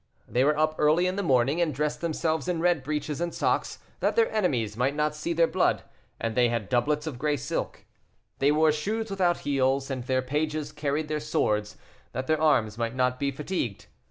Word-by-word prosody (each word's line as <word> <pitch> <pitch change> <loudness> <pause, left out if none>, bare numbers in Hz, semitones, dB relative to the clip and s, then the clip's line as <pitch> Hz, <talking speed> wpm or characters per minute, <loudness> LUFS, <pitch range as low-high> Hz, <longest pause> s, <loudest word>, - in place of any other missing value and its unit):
They 125 - +2
were 150 +2 +3
up 155 0 +1
early 155 +4 +4
in 185 +1 0
the 200 - -1
morning, 135 0 +2
and 155 -5 0
dressed 150 +2 -1
themselves 160 -1 -1
in 175 -2 0
red 175 -3 +2
breeches 150 +2 -3
and 175 0 -1
socks, - - 0 0.2
that - - +1
their 460 -1 +3
enemies 125 - 0
might 130 +5 0
not 150 0 +1
see 150 +3 -4
their 165 0 +4
blood, - - +1 0.4
and 115 -1 -2
they 120 +1 +3
had 115 -3 -2
doublets 145 +5 +1
of 140 -6 -5
gray 150 +1 +1
silk. 140 +5 -4 0.5
They 140 +2 +4
wore 155 +1 +4
shoes 215 +8 -2
without 180 -3 +1
heels, 135 -1 +1
and 130 -2 -3
their 130 +1 0
pages 150 +2 -2
carried 150 0 -2
their 155 0 -1
swords, 105 -8 -1 0.4
that 130 - -3
their 155 +2 +1
arms 115 -8 +2
might 115 +1 -2
not 125 0 +1
be 140 -1 +1
fatigued. 140 - -3
150 Hz, 205 wpm, -27 LUFS, 130-160 Hz, 0.5 s, early